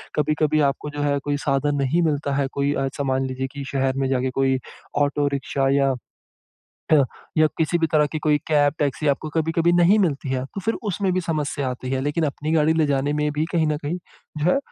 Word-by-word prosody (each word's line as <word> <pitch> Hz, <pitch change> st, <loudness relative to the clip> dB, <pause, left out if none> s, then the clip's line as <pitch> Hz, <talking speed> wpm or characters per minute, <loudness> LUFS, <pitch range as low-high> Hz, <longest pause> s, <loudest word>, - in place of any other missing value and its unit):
कभी-कभी 155 Hz, +1 st, +1 dB
आपको 145 Hz, +2 st, -5 dB
जो -, -, -1 dB
है 145 Hz, -1 st, +1 dB
कोई 145 Hz, 0 st, -1 dB
साधन 145 Hz, 0 st, 0 dB
नहीं 155 Hz, +6 st, +2 dB
मिलता 145 Hz, -3 st, 0 dB
है, 140 Hz, -1 st, +1 dB
कोई 140 Hz, +1 st, 0 dB
अ, 135 Hz, -, -1 dB
ऐसा 135 Hz, +1 st, -3 dB
मान 135 Hz, -1 st, 0 dB
लीजिए 130 Hz, 0 st, -3 dB
कि 140 Hz, -1 st, -5 dB
शहर 135 Hz, -1 st, +1 dB
में 135 Hz, -1 st, +1 dB
जाके 130 Hz, 0 st, +1 dB
कोई 135 Hz, -1 st, +2 dB, 0.4 s
ऑटो 145 Hz, 0 st, +1 dB
रिक्शा 135 Hz, 0 st, -1 dB
या 135 Hz, -1 st, +3 dB, 1.0 s
ह 145 Hz, -3 st, +6 dB, 0.3 s
या 155 Hz, -, +6 dB
किसी 165 Hz, +2 st, +1 dB
भी 165 Hz, -, +2 dB
तरह 150 Hz, -1 st, +4 dB
की 155 Hz, -, -1 dB
कोई 150 Hz, -1 st, +2 dB
कैब-टैक्सी 145 Hz, -1 st, +1 dB
आपको 145 Hz, +2 st, 0 dB
कभी-कभी 165 Hz, +2 st, +1 dB
नहीं 175 Hz, +4 st, +5 dB
मिलती 150 Hz, -8 st, 0 dB
है। 130 Hz, -1 st, -1 dB
तो 195 Hz, -, -3 dB
फ़िर 225 Hz, +4 st, 0 dB, 0.2 s
उसमें 190 Hz, 0 st, 0 dB
भी 185 Hz, -, +1 dB
समस्या 150 Hz, -5 st, -2 dB
आती 125 Hz, 0 st, -5 dB
है 130 Hz, 0 st, 0 dB
लेकिन 145 Hz, +4 st, 0 dB
अपनी 150 Hz, +2 st, -3 dB
गाड़ी 160 Hz, -1 st, +4 dB
ले 160 Hz, -2 st, +2 dB
जाने 140 Hz, 0 st, 0 dB
में 150 Hz, 0 st, 0 dB
भी 150 Hz, +1 st, 0 dB
कहीं 165 Hz, -3 st, +2 dB
न 150 Hz, -1 st, +1 dB
कहीं 165 Hz, +5 st, -2 dB, 0.4 s
जो 155 Hz, +4 st, +2 dB
है -, -, +3 dB
145 Hz, 220 wpm, -23 LUFS, 135-155 Hz, 1.0 s, ह